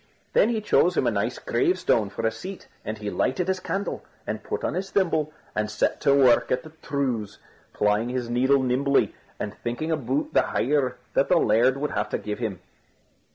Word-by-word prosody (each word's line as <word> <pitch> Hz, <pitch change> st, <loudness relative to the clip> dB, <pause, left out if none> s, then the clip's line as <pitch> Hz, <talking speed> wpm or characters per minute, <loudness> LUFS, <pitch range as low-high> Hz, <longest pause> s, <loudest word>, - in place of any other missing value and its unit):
Then 220 Hz, -, +5 dB
he 225 Hz, -2 st, 0 dB
chose 210 Hz, -, +3 dB
him -, -, +2 dB
a -, -, +3 dB
nice -, -, -1 dB
gravestone 360 Hz, -, +1 dB
for 100 Hz, -, -4 dB
a 110 Hz, -, +3 dB
seat 185 Hz, +12 st, -8 dB, 0.2 s
and 110 Hz, 0 st, -4 dB
he 105 Hz, -1 st, -4 dB
lighted 170 Hz, +7 st, 0 dB
his 190 Hz, 0 st, 0 dB
candle, 195 Hz, +2 st, -3 dB, 0.2 s
and -, -, -3 dB
put 435 Hz, 0 st, -4 dB
on -, -, 0 dB
his 190 Hz, +2 st, -3 dB
thimble, 165 Hz, -6 st, +1 dB, 0.2 s
and 105 Hz, 0 st, 0 dB
set 105 Hz, -, 0 dB
to 140 Hz, -, +4 dB
work 130 Hz, -4 st, +4 dB
at 125 Hz, 0 st, +1 dB
the 155 Hz, -, -11 dB
trews; 125 Hz, -8 st, -2 dB, 0.3 s
plying 105 Hz, +3 st, +1 dB
his 125 Hz, -1 st, -2 dB
needle 130 Hz, +3 st, +3 dB
nimbly, 135 Hz, +2 st, +2 dB, 0.3 s
and 105 Hz, -, -3 dB
thinking 120 Hz, +9 st, -3 dB
about 140 Hz, -1 st, -1 dB
the -, -, +5 dB
hire 130 Hz, -1 st, 0 dB, 0.2 s
that -, -, +2 dB
the -, -, +5 dB
laird 120 Hz, +5 st, +3 dB
would 145 Hz, +1 st, -2 dB
have 105 Hz, 0 st, -1 dB
to -, -, -1 dB
give 105 Hz, +1 st, -5 dB
him. 105 Hz, -7 st, -3 dB
130 Hz, 200 wpm, -25 LUFS, 110-155 Hz, 0.3 s, Then